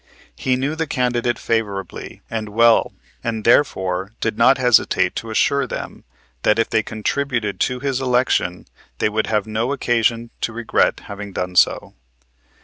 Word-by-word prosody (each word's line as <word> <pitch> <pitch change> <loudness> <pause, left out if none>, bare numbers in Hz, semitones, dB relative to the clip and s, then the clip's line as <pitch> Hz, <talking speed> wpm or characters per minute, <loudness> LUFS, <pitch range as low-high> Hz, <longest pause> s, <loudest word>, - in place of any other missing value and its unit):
He 130 -1 0
knew 135 +4 -2
the 160 0 -2
candidate 120 -2 0
favorably 100 -5 -3
and 110 -2 -4
well 115 +2 +4 0.3
and 110 -2 -3
therefore 95 -6 +2
did 110 - -1
not 120 +4 +5
hesitate 125 -3 +3
to 115 - -5
assure 140 +5 +1
them - - -7 0.4
that 105 - +3
if 115 - 0
they 110 - +3
contributed 110 0 -2
to 125 -1 0
his 135 -2 -1
election 125 -8 +1 0.3
they - - +1
would 110 +1 -1
have 105 -2 0
no 110 +4 -2
occasion 115 -3 0
to 115 - -2
regret 115 0 +1
having 100 -1 -8
done 90 0 -4
so. - - +3
115 Hz, 150 wpm, -20 LUFS, 105-125 Hz, 0.4 s, not